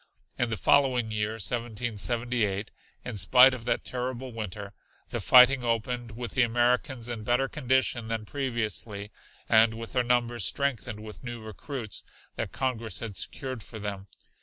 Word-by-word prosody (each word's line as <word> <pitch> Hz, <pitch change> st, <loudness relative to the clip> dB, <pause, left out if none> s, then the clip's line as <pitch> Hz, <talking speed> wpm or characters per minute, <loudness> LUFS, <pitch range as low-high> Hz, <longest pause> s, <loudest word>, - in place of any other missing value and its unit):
In 120 Hz, -, +1 dB
the 110 Hz, -, -2 dB
following 125 Hz, +1 st, +3 dB
year, 105 Hz, 0 st, -1 dB
1778, 115 Hz, 0 st, -1 dB, 0.3 s
in 120 Hz, -4 st, -4 dB
spite 125 Hz, +7 st, +7 dB
of 120 Hz, -3 st, -6 dB
that -, -, 0 dB
terrible 125 Hz, 0 st, -4 dB
winter, 105 Hz, -3 st, -6 dB, 0.4 s
the -, -, -3 dB
fighting 125 Hz, +1 st, +7 dB
opened 120 Hz, 0 st, -1 dB
with 120 Hz, +1 st, -5 dB
the 130 Hz, -, +2 dB
Americans 120 Hz, +1 st, +1 dB
in 115 Hz, -3 st, -4 dB
better 125 Hz, +4 st, +2 dB
condition 130 Hz, -4 st, +1 dB
than 110 Hz, -1 st, -3 dB
previously 110 Hz, -6 st, -3 dB, 0.4 s
and 110 Hz, 0 st, +5 dB
with 115 Hz, 0 st, -7 dB
their 125 Hz, -, +3 dB
numbers 120 Hz, -2 st, +1 dB
strengthened 115 Hz, -4 st, -1 dB
with 110 Hz, +2 st, -10 dB
new 120 Hz, -1 st, -6 dB
recruits 110 Hz, +1 st, -6 dB, 0.3 s
that -, -, -3 dB
Congress 115 Hz, -7 st, -2 dB
had 110 Hz, -4 st, -5 dB
secured 130 Hz, +1 st, -5 dB
for 110 Hz, -, -9 dB
them. 100 Hz, -2 st, -5 dB
120 Hz, 150 wpm, -28 LUFS, 110-125 Hz, 0.4 s, spite